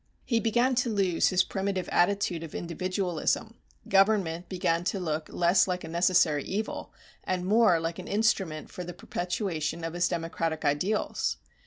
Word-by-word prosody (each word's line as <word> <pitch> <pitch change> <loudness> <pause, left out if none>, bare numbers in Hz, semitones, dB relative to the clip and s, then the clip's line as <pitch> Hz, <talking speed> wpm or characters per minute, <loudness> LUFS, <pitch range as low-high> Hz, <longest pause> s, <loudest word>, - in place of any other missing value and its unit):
He 230 -3 +2
began 240 +3 +2
to 250 -1 +2
lose 195 -5 +2
his 185 -1 +3
primitive 195 -1 -2
attitude 180 -2 +1
of 165 -2 -8
individualism, 185 +5 -2 0.3
government 195 -4 +2
began 175 -3 0
to 195 - -1
look 155 -3 -3
less 175 +3 +3
like 180 -1 -2
a - - -6
necessary 170 -3 +3
evil 210 +3 -4 0.3
and 180 -1 -2
more 210 -3 +4
like 165 +1 -3
an 180 - -8
instrument 195 -7 0
for 180 - -6
the 175 0 -7
perpetuation 175 -3 -3
of 165 0 -3
his 175 0 +1
democratic 165 -1 -2
ideals. 180 +9 0
180 Hz, 155 wpm, -28 LUFS, 165-200 Hz, 0.3 s, more